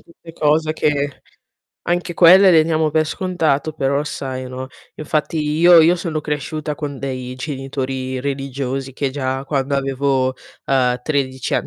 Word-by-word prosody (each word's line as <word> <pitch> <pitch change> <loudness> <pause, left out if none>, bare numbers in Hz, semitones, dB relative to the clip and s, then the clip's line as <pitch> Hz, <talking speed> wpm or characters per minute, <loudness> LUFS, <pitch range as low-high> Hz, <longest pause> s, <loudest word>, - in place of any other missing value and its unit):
tutte 170 0 -15
cose 155 0 +1
che 145 -2 -1 0.6
anche 175 0 -1
quelle 185 +3 +7
le 160 -2 +6
diamo 160 -1 +1
per 155 0 +3
scontato 160 -4 -1
però 140 -1 0
sai, 130 -3 -5
no, 130 +1 -6 0.3
infatti 155 +1 -2
io 165 +3 +5
io 170 +3 +4
sono 165 -3 -3
cresciuta 150 +1 -4
con 145 -3 -5
dei 130 -2 -5
genitori 130 -1 -4
religiosi 135 -1 -4
che 135 +1 -2
già 130 -1 -3
quando 140 0 -1
avevo, 135 -1 0 0.3
ehm, 125 -2 +1
13 130 -3 -2
ann - - 0
140 Hz, 145 wpm, -19 LUFS, 130-155 Hz, 0.6 s, quelle